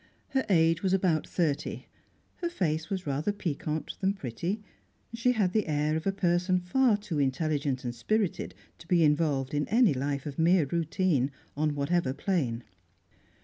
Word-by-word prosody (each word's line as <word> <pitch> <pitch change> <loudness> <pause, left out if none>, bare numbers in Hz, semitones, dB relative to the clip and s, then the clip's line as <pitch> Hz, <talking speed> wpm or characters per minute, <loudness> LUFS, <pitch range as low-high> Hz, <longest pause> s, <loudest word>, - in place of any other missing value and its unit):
Her 265 -1 +1
age 165 -2 +4
was 190 -1 +1
about 180 -5 +2
thirty; 155 -6 -1 0.5
her 345 - -2
face 160 - -1
was 190 -2 -3
rather 145 +7 0
piquant 160 -5 -3
than 195 +1 +2
pretty; 175 - -3 0.5
she 230 +2 +2
had 200 -6 +1
the 215 -4 +1
air 150 0 +1
of 160 +3 -2
a - - +3
person 180 -1 +1
far 215 +5 +2
too 205 -7 -4
intelligent 140 -1 0
and 120 -1 -3
spirited 210 - -1 0.2
to 165 - -14
be 170 -2 +4
involved 150 -3 +1
in 145 0 0
any 225 - +4
life 140 +1 -2
of 145 -1 -6
mere 170 0 +4
routine, 160 -2 +1 0.3
on 150 0 0
whatever 145 -1 0
plane. 130 - -1
165 Hz, 160 wpm, -29 LUFS, 145-190 Hz, 0.5 s, age